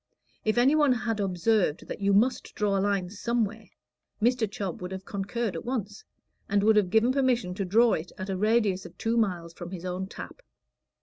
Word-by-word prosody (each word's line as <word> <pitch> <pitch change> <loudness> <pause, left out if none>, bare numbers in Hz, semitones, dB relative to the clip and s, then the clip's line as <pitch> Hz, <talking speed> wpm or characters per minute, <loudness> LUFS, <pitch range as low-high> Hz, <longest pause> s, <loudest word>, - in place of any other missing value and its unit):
If 215 +1 0
any 255 +4 +5
one 295 -4 +4
had 225 -2 -2
observed 190 -2 +1
that - - -6
you 200 0 +2
must 225 +6 +1
draw 205 -2 +1
a 195 - +2
line 195 -3 0
somewhere, 225 -1 -2 0.5
Mr. 235 -1 +2
Chubb 195 -4 -5
would 180 +1 -5
have 190 0 -6
concurred 200 +2 -3
at - - -5
once, 215 -5 -4 0.5
and 200 0 +2
would 220 +1 +5
have 205 -4 +3
given 220 +5 +4
permission 250 -8 +1
to 195 +1 -3
draw 225 +5 +4
it 165 +3 -3
at 190 - -5
a - - -1
radius 210 -2 +2
of 175 - -12
two 230 +1 0
miles 180 -7 0
from 175 +1 -8
his 185 -1 -7
own 185 +1 -3
tap. - - -9
205 Hz, 200 wpm, -27 LUFS, 190-230 Hz, 0.5 s, any